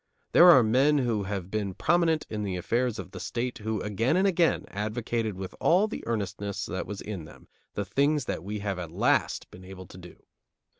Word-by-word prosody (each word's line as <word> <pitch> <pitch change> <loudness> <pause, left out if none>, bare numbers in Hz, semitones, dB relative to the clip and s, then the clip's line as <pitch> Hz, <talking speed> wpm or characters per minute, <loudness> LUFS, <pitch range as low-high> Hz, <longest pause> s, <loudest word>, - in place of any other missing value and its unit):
There 175 - +8
are 130 -8 +8
men 135 +7 +3
who 115 -7 0
have 95 -2 -4
been 100 -3 -2
prominent 165 -1 +2
in 105 -1 -4
the 100 -3 -2
affairs 115 +6 -1
of 95 - -7
the 95 - -8
State 120 +5 -3
who 110 -1 -3
again 115 - 0
and 190 - +3
again 175 -3 +2
advocated 110 +1 -2
with 95 0 -7
all 185 +6 +4
the 220 - -6
earnestness 100 -3 -3
that 95 - -4
was 100 0 -6
in 95 -7 -6
them - - -15 0.3
the 100 - -2
things 140 +6 +1
that - - -4
we 105 +3 -4
have 100 -3 -3
at 85 -3 -5
last 85 - 0
been 95 - -13
able 95 0 -10
to 90 - -13
do. 90 -1 -14
105 Hz, 205 wpm, -27 LUFS, 95-125 Hz, 0.3 s, There